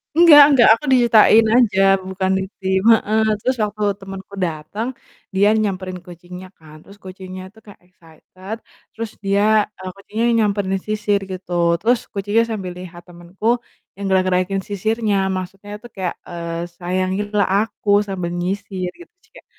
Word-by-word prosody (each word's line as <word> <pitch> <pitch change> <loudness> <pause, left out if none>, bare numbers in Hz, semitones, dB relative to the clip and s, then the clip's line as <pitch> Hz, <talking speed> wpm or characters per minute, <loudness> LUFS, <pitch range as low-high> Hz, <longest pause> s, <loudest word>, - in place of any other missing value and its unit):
Nggak 330 -4 +9
nggak, 240 - +6
aku 265 - -4
diceritain 225 -2 +5
aja, 210 -6 +3 0.2
bukan 190 0 -3
di - - -2 0.2
tim, 190 0 0
heeh, 220 0 +2 0.2
terus 255 0 +1
waktu 210 0 -3 0.2
temenku 195 0 -10
dateng, 175 +6 -3 0.5
dia 200 +2 +4
nyamperin 190 -4 -2
kucingnya 180 +1 -11
kan, 155 -1 -16
terus 200 +1 -16
kucingnya 185 0 -9
tuh 220 - -19
kayak 205 - -15
excited 185 +4 -11 0.4
terus 225 -1 -5
dia 205 +2 +3
eee, 185 0 -7
kucingnya 215 +4 -3
nyamperin 200 -2 0
sisir 210 -1 0
gitu, 185 -1 -7 0.3
terus 235 +2 +2
kucingnya 205 +3 +1
sambil 190 -4 -4
lihat 175 -1 -10
temenku 175 +5 -7 0.5
yang 200 0 -6
gerak-gerakin 185 +1 +1
sisirnya, 215 +1 -1 0.2
maksudnya 195 +2 -7
tuh 240 - -11
kayak, 185 -3 -3
eee, 170 0 -5
"Sayangilah 185 +3 -1
aku 220 -1 -6 0.2
sambil 180 -3 -4
nyisir," 190 -1 -3
gitu 350 - -15
sih, 440 - -30
Kak, - - -16
195 Hz, 145 wpm, -19 LUFS, 185-215 Hz, 0.5 s, Nggak